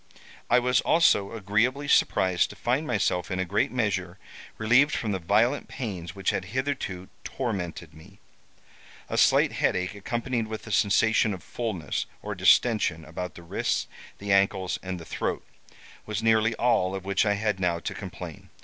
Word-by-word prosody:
I -, -, +5 dB
was 125 Hz, 0 st, +3 dB
also 105 Hz, -12 st, +3 dB
agreeably 115 Hz, +7 st, 0 dB
surprised 95 Hz, -9 st, +3 dB
to -, -, -10 dB
find 130 Hz, +6 st, -1 dB
myself, 90 Hz, -6 st, 0 dB
in 95 Hz, -, -2 dB
a 95 Hz, -, 0 dB
great 100 Hz, +9 st, 0 dB
measure, 115 Hz, -5 st, -1 dB, 0.4 s
relieved 125 Hz, +7 st, +4 dB
from 110 Hz, -, -2 dB
the 95 Hz, -, -1 dB
violent 110 Hz, +10 st, +2 dB
pains 95 Hz, -, -6 dB
which 95 Hz, -1 st, 0 dB
had 95 Hz, -, -3 dB
hitherto 115 Hz, -5 st, -3 dB, 0.2 s
tormented 90 Hz, -, -4 dB
me. 95 Hz, +6 st, -16 dB, 0.9 s
A -, -, -3 dB
slight -, -, +4 dB
headache, 90 Hz, +1 st, 0 dB
accompanied 115 Hz, +3 st, -2 dB
with 110 Hz, 0 st, -6 dB
a 110 Hz, -, -8 dB
sensation 105 Hz, +1 st, +3 dB
of 90 Hz, -, -13 dB
fulness 100 Hz, -, -3 dB, 0.2 s
or -, -, -4 dB
distention 105 Hz, -9 st, +3 dB
about 85 Hz, +2 st, -6 dB
the 85 Hz, -, -11 dB
wrists, 85 Hz, -, -1 dB, 0.3 s
the 100 Hz, 0 st, -4 dB
ankles, 95 Hz, -1 st, +1 dB
and 95 Hz, -1 st, -5 dB
the 85 Hz, -, -10 dB
throat, -, -, -3 dB, 0.6 s
was 105 Hz, -1 st, -3 dB
nearly 115 Hz, 0 st, +3 dB
all 95 Hz, -6 st, +2 dB
of 95 Hz, -1 st, -6 dB
which 100 Hz, 0 st, +2 dB
I 105 Hz, -2 st, +2 dB
had 105 Hz, -1 st, -1 dB
now 90 Hz, -2 st, +1 dB
to -, -, -5 dB
complain. -, -, -9 dB
100 Hz, 165 wpm, -26 LUFS, 95-115 Hz, 0.9 s, I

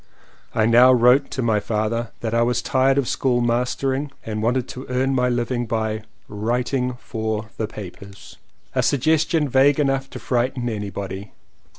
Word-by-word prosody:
I 110 Hz, -, +3 dB
now 120 Hz, +3 st, +7 dB
wrote 125 Hz, +3 st, +4 dB
to 130 Hz, -, -3 dB
my 110 Hz, -2 st, +2 dB
father 110 Hz, +2 st, -2 dB
that 115 Hz, -1 st, -2 dB
I 115 Hz, -, +3 dB
was 120 Hz, 0 st, +1 dB
tired 135 Hz, +1 st, +2 dB
of 140 Hz, -3 st, +1 dB
school 125 Hz, -2 st, +1 dB
mastering 130 Hz, +4 st, 0 dB
and 110 Hz, -1 st, -3 dB
wanted 125 Hz, +2 st, 0 dB
to 130 Hz, -, -8 dB
earn 130 Hz, +2 st, +1 dB
my 125 Hz, -1 st, +2 dB
living 120 Hz, 0 st, -1 dB
by 110 Hz, -1 st, -1 dB, 0.2 s
'* -, -, -40 dB
writing 125 Hz, +4 st, -1 dB
for 110 Hz, -2 st, -4 dB
the 110 Hz, -, -2 dB
papers" 100 Hz, -1 st, -11 dB, 0.2 s
— -, -, -38 dB
a -, -, +2 dB
suggestion 155 Hz, +2 st, +2 dB
vague 135 Hz, +2 st, +4 dB
enough 135 Hz, -1 st, 0 dB
to -, -, -8 dB
frighten 125 Hz, 0 st, -1 dB
anybody. 100 Hz, -2 st, -5 dB
120 Hz, 170 wpm, -22 LUFS, 110-130 Hz, 0.2 s, now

